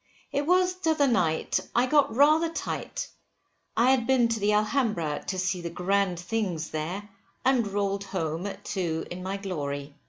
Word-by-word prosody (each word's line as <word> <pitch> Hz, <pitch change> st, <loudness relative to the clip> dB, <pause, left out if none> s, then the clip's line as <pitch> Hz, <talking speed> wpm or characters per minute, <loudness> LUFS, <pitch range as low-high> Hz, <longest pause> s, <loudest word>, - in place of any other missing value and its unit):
It 285 Hz, +1 st, -1 dB
was 365 Hz, +1 st, +4 dB
t'other 320 Hz, -5 st, +1 dB
night, 180 Hz, -, +1 dB, 0.2 s
I 240 Hz, +2 st, +4 dB
got 275 Hz, -3 st, +3 dB
rather 305 Hz, +5 st, +5 dB
tight, -, -, -4 dB, 0.7 s
I 245 Hz, +3 st, +5 dB
had 250 Hz, -3 st, +2 dB
been 255 Hz, -3 st, +4 dB
to 230 Hz, -1 st, -1 dB
the 205 Hz, +1 st, +2 dB
Alhambra, 210 Hz, -, 0 dB
to 190 Hz, -, -2 dB
see 180 Hz, -1 st, -1 dB
the 170 Hz, -, -4 dB
grand 185 Hz, +1 st, 0 dB
things 175 Hz, -4 st, -2 dB
there, 175 Hz, +7 st, -4 dB, 0.4 s
and 255 Hz, -4 st, +3 dB
roll'd 200 Hz, 0 st, -1 dB
home 165 Hz, -1 st, -3 dB
at 200 Hz, -, -8 dB
two 165 Hz, -4 st, -2 dB
in 180 Hz, +1 st, -5 dB
my 190 Hz, +2 st, -3 dB
glory. 145 Hz, -7 st, -4 dB
200 Hz, 165 wpm, -27 LUFS, 175-260 Hz, 0.7 s, rather